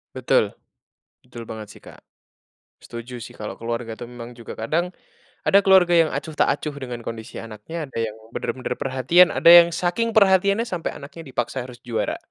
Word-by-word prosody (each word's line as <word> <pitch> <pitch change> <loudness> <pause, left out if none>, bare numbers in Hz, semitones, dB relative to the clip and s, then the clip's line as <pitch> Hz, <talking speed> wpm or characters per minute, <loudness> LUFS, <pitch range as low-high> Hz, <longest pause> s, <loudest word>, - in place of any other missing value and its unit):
Betul, - - +2 0.7
betul 120 -2 -10
banget, 110 -2 -7
sih, - - -14
Kak. - - -15 0.8
Setuju, 120 +1 -8
sih, - - -10
kalau 105 - -5
keluarga, 115 0 -4
tuh, 120 +2 -9
memang 120 0 -9
juga 120 -2 -10
kadang 160 +11 -1 0.6
ada 200 - +6
keluarga 190 -2 +6
yang 165 -2 +5
acuh 150 +3 -4
tak - - +3
acuh 150 - -5
dengan 125 -2 -6
kondisi 110 -1 -7
anaknya, 115 +9 -7
ada - - -9
yang 110 -1 -4 0.2
benar-benar 130 - -3
perhatian, 135 +7 +4
ada 170 - +4
yang 170 0 +10
saking 180 +7 0
perhatiannya 200 +1 +4
sampai 180 -7 -4
anaknya 145 +4 -10
dipaksa 125 0 -3
harus 125 -1 -11
juara. 115 -2 -2
130 Hz, 170 wpm, -23 LUFS, 115-175 Hz, 0.8 s, yang